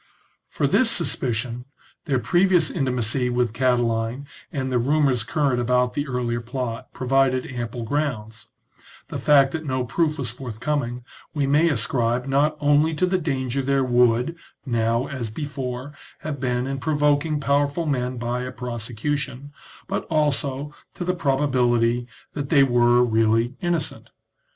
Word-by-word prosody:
For - - -1
this - - +3
suspicion, 120 +1 -1 0.4
their 140 -5 +1
previous 175 +3 +3
intimacy 125 -4 0
with 120 -2 0
Cati 125 0 +2
line, 115 +4 -2 0.3
and 135 -5 -3
the 125 - +2
rumours 135 -2 +2
current 135 0 0
about 125 +1 +2
the 145 0 -2
earlier 120 -2 -2
plot, 120 -1 -5
provided 130 0 +1
ample 120 -2 -5
grounds; 115 -4 -3 0.6
the - - -4
fact 140 -2 +5
that 160 +2 -4
no 130 -3 -1
proof 155 +4 0
was 125 -5 -2
forthcoming 125 +1 -3 0.3
we 145 -2 +1
may 150 +5 +4
ascribe 120 -1 0
not 145 +3 +1
only 150 +2 +3
to 185 - +2
the 185 0 +1
danger 135 -4 -1
there 135 0 +1
would, 125 +3 +2 0.3
now 115 0 +1
as 135 -5 -4
before, 135 +1 -5 0.3
have 150 -3 -4
been 125 -1 -1
in 135 0 -3
provoking 150 +2 +1
powerful 145 +3 +1
men 125 -3 -1
by 120 +1 -2
a 130 0 -4
prosecution, 125 +4 -4 0.4
but - - -2
also 145 -2 -1 0.2
to 175 - -4
the 180 - +1
proba 145 -4 +1
bility 120 -2 +2 0.3
that 140 -2 -4
they 140 -4 +6
were 120 -1 +4
really 115 +1 +2
innocent. 175 -3 -2
130 Hz, 145 wpm, -23 LUFS, 120-145 Hz, 0.6 s, they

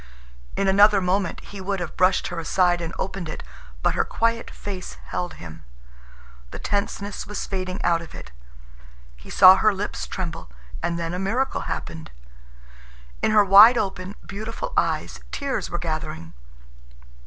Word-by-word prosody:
In 195 - 0
another 205 +1 +6
moment 185 0 -1
he 200 -1 -10
would 195 +1 -2
have 175 - -5
brushed 185 +1 +2
her 175 - -4
aside 175 +1 +2
and 165 -1 -4
opened 190 -3 -4
it, - - -7 0.4
but - - +3
her - - +1
quiet 230 0 -1
face 190 -3 -7
held 180 0 -5
him. 80 -1 -10 0.9
The - - -8
tenseness 200 0 -3
was 210 - -4
fading 185 -1 -4
out 170 -1 +2
of 170 - -11
it. - - -10 0.8
He - - -15
saw 185 +1 +8
her 215 - +4
lips 205 +2 -4
tremble, 170 - -5 0.3
and 170 0 -1
then 165 0 -3
a 180 - -3
miracle 230 +8 -1
happened. 160 -1 -5 1.1
In - - +2
her 210 -1 +5
wide 210 +5 +9
open, 190 -2 -3
beautiful 225 - -6
eyes - - 0
tears 280 -1 -3
were 175 - -3
gathering. 155 - -5
190 Hz, 155 wpm, -24 LUFS, 175-205 Hz, 1.1 s, wide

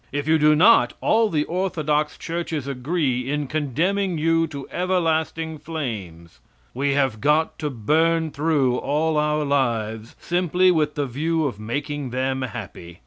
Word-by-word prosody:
If 145 +1 -3
you 160 0 +4
do 150 0 +5
not, 215 +9 +5
all 225 0 +2
the 150 -5 +1
orthodox 155 -4 -1
churches 165 -4 -4
agree 135 -1 -1
in 150 0 -1
condemning 165 +7 -1
you 165 +1 +2
to 140 -3 -8
everlasting 160 -3 -1
flames. 105 - -6 0.3
We 140 +2 0
have 130 -6 0
got 150 +3 +1
to 150 - -2
burn 160 +7 +1
through 140 -5 +1
all 155 +4 0
our 150 0 +1
lives 115 -5 -1
simply 180 +1 +2
with 155 -3 0
the 145 - -1
view 155 +5 -1
of 125 -7 -3
making 145 +5 -4
them 130 +1 -1
happy. 100 -9 -7
150 Hz, 145 wpm, -23 LUFS, 130-165 Hz, 0.3 s, do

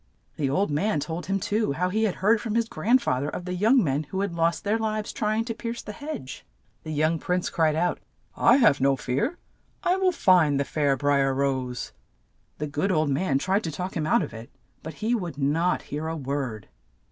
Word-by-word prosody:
The 140 -3 -1
old 190 +5 +1
man 155 +4 +1
told 160 +4 -5
him 195 0 0
too 210 -4 0
how 180 +5 0
he 220 +4 +1
had 200 - -1
heard 215 +3 +2
from 225 -2 -3
his 230 -1 +2
grand 240 +3 +2
fa 125 - +1
ther 145 +2 -2
of 175 - -6
the 180 - -3
young 225 +7 +4
men 145 0 0
who 190 +7 -3
had 200 -3 -2
lost 170 0 0
their 210 +2 +1
lives 215 -1 -2
try 215 0 0
ing 225 - 0
to 230 - -3
pierce 230 +1 -5
the - - -6
hedge. 210 - -7 0.4
The - - -9
young 155 +2 +1
prince 180 +2 -1
cried 160 -2 +2
out, 175 +2 0 0.4
"I 240 - +5
have 210 - +4
no 135 0 +4
fear. 140 - -2 0.5
I 360 +1 +2
will 380 -1 +3
find 175 - +4
the 140 - 0
fair 145 -2 +1
Bri 145 0 +2
er 135 -1 +1
Rose." 130 -2 -2 0.6
The 150 - -3
good 150 +7 -1
old 155 -4 +1
man 140 -1 +1
tried 190 +8 0
to 165 - -3
talk 180 +5 -5
him 155 -3 -1
out - - +3
of - - -7
it, 115 +1 -9 0.3
but 160 -1 -8
he 235 - +2
would 175 - -3
not 155 +6 +1
hear 150 +2 -4
a 165 0 -3
word. 135 -7 -4
170 Hz, 230 wpm, -26 LUFS, 145-210 Hz, 0.6 s, I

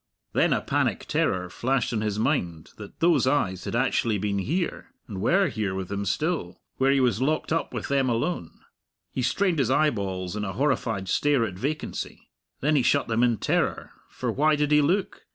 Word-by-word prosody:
Then - - +3
a - - +2
panic - - 0
terror 90 -1 0
flashed 125 +6 -1
on 110 - 0
his 105 -1 -1
mind 90 - -1
that 105 -2 -11
those 170 -5 +4
eyes 95 -10 0
had - - -3
actually 110 -3 +1
been 100 0 -1
here 165 - -2 0.2
and 95 -4 -6
were 190 - +3
here 105 - -2
with 95 -1 -5
him 100 0 -2
still 105 - -2 0.2
where 135 +1 +3
he 140 - +3
was 125 -3 +2
locked 155 +3 0
up 165 - -1
with - - -4
them 135 -2 +1
alone. 120 - -2 0.5
He 130 - -2
strained 175 +6 +1
his 130 - +2
eyeballs 100 - 0
in 105 - -3
a 95 -1 -3
horrified 120 -8 0
stare 145 +4 +2
at 100 - -5
vacancy. 140 +11 -5 0.3
Then 150 +2 +2
he 140 - +4
shut 140 +3 +2
them 115 +1 +1
in 120 -2 +3
terror, - - -1 0.2
for - - -3
why 155 +2 +3
did 150 0 0
he 150 0 +6
look? 185 +7 -1
125 Hz, 195 wpm, -26 LUFS, 100-150 Hz, 0.5 s, he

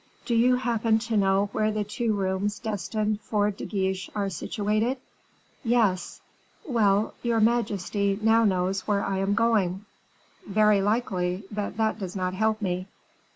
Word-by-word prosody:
"Do 240 - -1
you 245 +2 +4
happen 230 -3 +1
to 225 0 -3
know 195 0 +2
where 215 0 +1
the 210 0 -1
two 220 +2 -1
rooms 195 +1 -1
destined 215 0 -2
for 210 -1 0
De 200 - -8
Guiche 190 -3 -2
are 200 -2 -1
situated?" 215 +8 -1 0.7
"Yes." 220 -7 +1 0.4
"Well, 215 -6 +2
your 235 -2 +1
majesty 205 -3 +1
now 225 +1 +4
knows 190 -1 0
where 200 -1 +1
I 195 -1 -1
am 195 +1 +1
going." 210 -4 +1 0.6
"Very 210 0 +4
likely; 195 -3 0
but 205 0 -4
that 220 0 0
does 190 -2 -5
not 185 -1 -1
help 220 +2 0
me." 185 0 -2
210 Hz, 150 wpm, -26 LUFS, 195-220 Hz, 0.7 s, you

